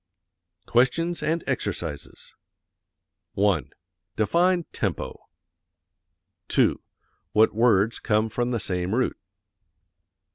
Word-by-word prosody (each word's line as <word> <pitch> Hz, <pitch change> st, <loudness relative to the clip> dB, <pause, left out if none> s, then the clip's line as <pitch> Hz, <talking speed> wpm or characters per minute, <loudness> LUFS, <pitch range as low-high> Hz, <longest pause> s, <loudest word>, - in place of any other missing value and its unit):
QUESTIONS 165 Hz, +8 st, +1 dB
AND 165 Hz, +1 st, -1 dB
EXERCISES -, -, -4 dB, 1.0 s
1. 100 Hz, -5 st, +1 dB, 0.5 s
Define 175 Hz, -, +2 dB
tempo. -, -, -4 dB, 1.2 s
2. -, -, +2 dB, 0.5 s
What 110 Hz, +1 st, +4 dB
words 110 Hz, -1 st, +3 dB
come 110 Hz, -1 st, +1 dB
from 120 Hz, +2 st, -2 dB
the 120 Hz, -2 st, -1 dB
same 90 Hz, +1 st, -2 dB
root? 130 Hz, -, +1 dB
115 Hz, 80 wpm, -25 LUFS, 105-155 Hz, 1.2 s, What